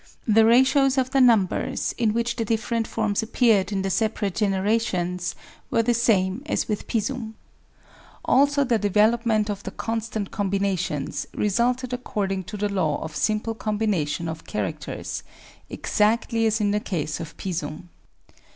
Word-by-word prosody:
The 220 0 +5
ratios 265 +3 +4
of 260 0 +1
the 270 -1 +3
numbers 225 -7 +2
in 230 -3 +1
which 235 +2 -1
the 230 - -1
different 225 +1 -1
forms 215 -1 0
appeared 220 -4 +2
in 195 -1 -1
the 195 - -1
separate 210 0 0
generations 190 -2 0 0.3
were 230 - +2
the 240 +1 +2
same 215 -3 +2
as - - -1
with 210 -2 -3
Pisum. 225 0 -2 0.9
Also 285 +1 +4
the 240 -4 +1
development 215 +1 +2
of 205 -2 -3
the - - -6
constant 225 -2 -4
com 200 -1 -1
binations 190 -7 -1
resulted 245 +4 0
according 195 -6 -2
to 210 +4 -7
the 205 +1 0
law 185 -8 0
of 160 -1 -7
simple 215 +1 0
combination 210 -8 -1
of 160 0 -6
characters, - - -4 0.5
exactly 225 +1 +1
as 220 +1 +1
in 205 -1 +1
the 210 - +1
case 160 -7 -3
of 165 -1 -8
Pisum. 170 -2 -5
215 Hz, 150 wpm, -24 LUFS, 195-230 Hz, 0.9 s, The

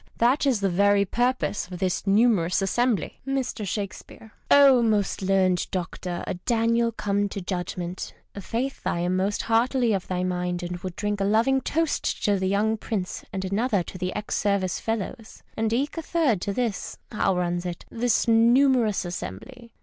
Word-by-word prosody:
That 255 +5 +3
is 245 -7 +2
the 195 - +2
very 200 +2 +3
purpose 245 0 0
of 180 -1 -7
this 185 +1 -1
numerous 195 -4 +3
assembly. 230 0 0
Mr. 260 -6 -2
Shakespeare. 205 +2 -6
— - - -36
Oh, 275 -3 +7
most 210 -4 +1
learned 185 -2 +2
doctor, 180 -1 -4
a - - -2
Daniel 230 +4 +1
come 205 -2 -1
to 200 - -5
judgment! 180 -1 -4 0.2
F 200 - -8
faith 255 +4 -3
I 170 - 0
am 180 +1 0
most 195 +2 0
heartily 235 +1 +2
of 190 -2 -2
thy 180 -1 -1
mind, 180 -1 -2
and 175 0 -4
would 185 -1 -6
drink 205 -1 -2
a - - +2
loving 230 +7 +3
toast 325 +2 -1
to 205 -2 +2
the 190 - 0
young 210 +3 +1
Prince 205 -4 -4
and 190 -1 -3
another 205 0 0
to 185 - -9
the 185 0 -2
ex 210 0 -3
Service 200 -3 0
fellows, 225 +1 -5
and 220 0 0
eke 280 +7 -1
a - - -3
third 305 - +1
to 200 - -2
this 230 -1 -3
— - - -39
how 195 -3 +1
runs 175 0 -1
it? 175 -2 -6
— - - -32
this 240 -2 +2
numerous 235 -2 +4
assembly. 175 - -7
205 Hz, 185 wpm, -25 LUFS, 185-235 Hz, 0.2 s, Oh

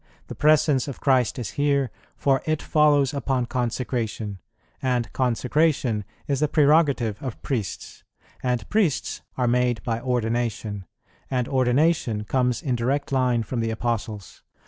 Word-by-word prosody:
"The - - -4
Presence 150 -3 +3
of 140 - -6
Christ 130 -4 +2
is 115 -5 -4
here, 140 -3 +1 0.3
for 135 -2 +2
It 155 -1 0
follows 150 -4 +3
upon 135 -3 0
Consecration; 120 -4 -3 0.4
and 125 -4 -1
Consecration 125 -2 +1 0.2
is 140 -2 0
the 150 - +2
prerogative 145 -8 +3
of 130 -5 -5
Priests; 115 -9 -4 0.4
and 125 -3 -1
Priests 205 -9 0 0.2
are 125 -1 +1
made 120 -3 +1
by 115 -1 -2
Ordination; 115 -5 -2 0.4
and 125 -2 0
Ordination 130 -3 +2
comes 125 - 0
in 130 -5 0
direct 135 +5 -1
line 125 -3 +2
from 120 +2 -4
the 115 0 0
Apostles. 110 -3 -3
125 Hz, 135 wpm, -24 LUFS, 115-140 Hz, 0.4 s, Presence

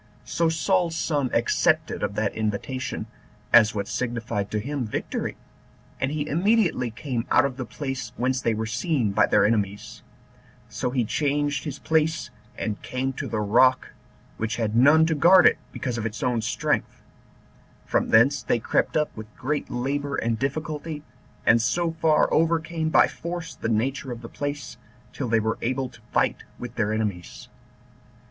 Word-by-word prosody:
So 165 -1 +1
Saul's 170 +1 +1
son 145 -5 0
accepted - - +1
of 100 - -2
that 110 -1 0
invitation, 110 +3 -3 0.5
as 110 -2 +7
what 100 -1 -2
signified 115 -5 -2
to 110 - -2
him 140 +4 -3
victory, 110 - -3 0.6
and 135 - 0
he 150 0 -2
immediately 175 - +2
came 120 +1 -4
out - - +5
of 135 -2 -2
the 130 -1 -5
place 135 -3 -5
whence 130 +1 0
they 115 - +1
were 110 +1 -2
seen 120 - 0
by - - +3
their 105 - +4
enemies: 105 -2 -1 0.7
so - - -3
he 125 -2 0
changed 145 +4 0
his 145 -2 -4
place, 160 0 0 0.3
and 105 -1 -3
came 130 +2 -2
to - - -5
the 110 - -2
rock, 130 +5 +4 0.5
which 110 +1 -2
had 110 -2 -1
none 145 +6 +6
to 160 - +1
guard 175 +4 +6
it, - - +5
because 125 -3 -3
of 110 - -3
its 105 -1 -6
own 120 -2 +1
strength; - - -1 0.8
from - - 0
thence 130 +5 +5
they - - +1
crept 115 - 0
up 150 -1 -1
with 110 0 -8
great 150 +3 -2
labor 140 +3 -2
and 115 -1 -1
difficulty, 150 +2 -3 0.4
and 115 0 +5
so 165 +8 +1
far 160 -1 +3
overcame 165 0 +1
by - - +5
force 170 0 -6
the - - -4
nature 130 +4 -1
of 120 0 -7
the - - -6
place, 145 0 -5 0.4
till 135 - -3
they 115 0 +3
were 110 +1 -1
able 130 +2 -1
to 125 - -18
fight - - +2 0.2
with 120 -1 -7
their 105 -3 0
enemies. 105 -5 -4
130 Hz, 165 wpm, -25 LUFS, 110-150 Hz, 0.8 s, as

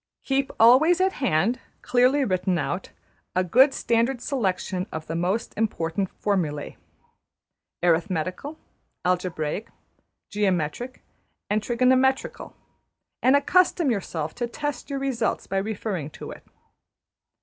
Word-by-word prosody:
Keep 270 0 0
always 275 +10 +6
at 380 +1 +3
hand, 230 - +2 0.2
clearly 255 +3 +3
written 185 -2 0
out, 170 +5 -3 0.5
a 185 - +3
good 255 - +5
standard 235 +1 +1
selection 195 -7 -2
of 160 0 -5
the 165 - -4
most 185 +7 -1
important 190 -3 -1
formul\ae{} 160 -8 -1 1.1
Arithmetical, 180 - 0 0.5
Algebraic, 180 +1 -1 0.6
Geometric, 205 +4 -1 0.5
and 215 +1 +2
Trigonometrical, 255 +3 +1 0.7
and 260 +2 +5
accustom 340 0 +3
yourself 165 -7 -3
to 240 -1 -3
test 290 +5 -4
your 280 - -2
results 270 -3 -1
by 195 - -2
referring 195 -6 -3
to - - -9
it. - - -11
215 Hz, 110 wpm, -25 LUFS, 180-260 Hz, 1.1 s, always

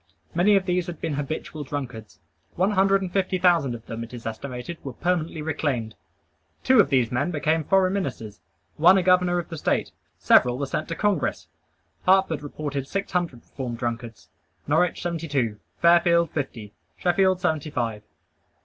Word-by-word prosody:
Many 190 +5 +4
of 195 -1 +2
these 180 -1 0
had 175 -3 -6
been 155 - -2
habitual 145 +1 -4
drunkards. 130 -6 -6 0.4
One 190 +4 +2
hundred 195 0 +3
and 180 -1 -5
fifty 190 -1 +1
thousand 170 -8 +3
of 115 - -11
them, 115 +1 -5
it 115 +2 -9
is 115 - -10
estimated, 125 +7 -6
were 135 - -6
permanently 165 0 -1
reclaimed. 140 -8 -2 0.7
Two 260 -2 +5
of 195 - +5
these 125 -5 +2
men 130 +7 0
became 160 0 0
foreign 190 +3 +3
ministers; 110 - -4 0.4
one 175 +5 +6
a 185 - +2
governor 180 -1 +3
of 175 0 -4
a 165 - -5
State; - - 0 0.3
several 125 0 +4
were 140 - -2
sent 155 +3 -3
to 165 - -4
Congress. 200 -4 0 0.6
Hartford 185 -5 +3
reported 145 -2 -5
six 195 +5 -3
hundred 170 -10 -2
reformed 125 -3 -6
drunkards; 115 -1 -5 0.4
Norwich, 180 -1 +1
seventy 170 -2 -3
two; 120 -8 -1 0.2
Fairfield, 170 -1 +5
fifty; 115 -8 -5 0.2
Sheffield, 185 +1 +2
seventy 160 -4 -1
five. 115 -6 -2
155 Hz, 165 wpm, -24 LUFS, 125-180 Hz, 0.7 s, one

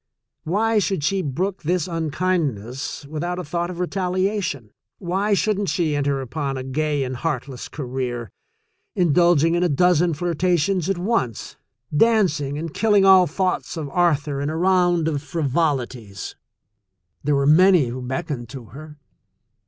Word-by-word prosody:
Why 215 +6 +2
should 195 -6 -1
she 195 +5 +1
brook 180 +6 -2
this 175 +1 0
unkind 165 -3 0
ness 125 +8 -7
without 165 +5 -4
a 180 - -4
thought 170 +3 -2
of 180 - -7
retaliation? 185 - -1 0.3
Why 195 +3 0
shouldn't 205 -1 0
she 155 -1 0
enter 140 -1 0
upon 135 +1 -3
a 130 - -4
gay 145 +2 -1
and 130 0 -4
heartless 135 -4 -4
career, 125 - -4 0.6
indulging 170 -1 +3
in 175 - +1
a 180 - +2
dozen 175 +1 +3
flirtations 175 +2 0
at 195 - 0
once 175 - -2 0.2
— - - -11
dancing 165 -9 +2
and 160 0 -5
killing 205 -3 +3
all 190 -2 +7
thoughts 185 +2 -2
of 150 -3 -4
Arthur 150 -5 +1
in 145 - -1
a 160 - -3
round 175 -2 +2
of 145 -3 -1
frivolities? 135 - -2 0.9
There 145 0 +2
were 140 0 +1
many 165 -2 +5
who 125 +2 -5
beckoned 125 -1 -4
to 130 -4 -9
her. 150 +3 -11
160 Hz, 150 wpm, -22 LUFS, 140-180 Hz, 0.9 s, all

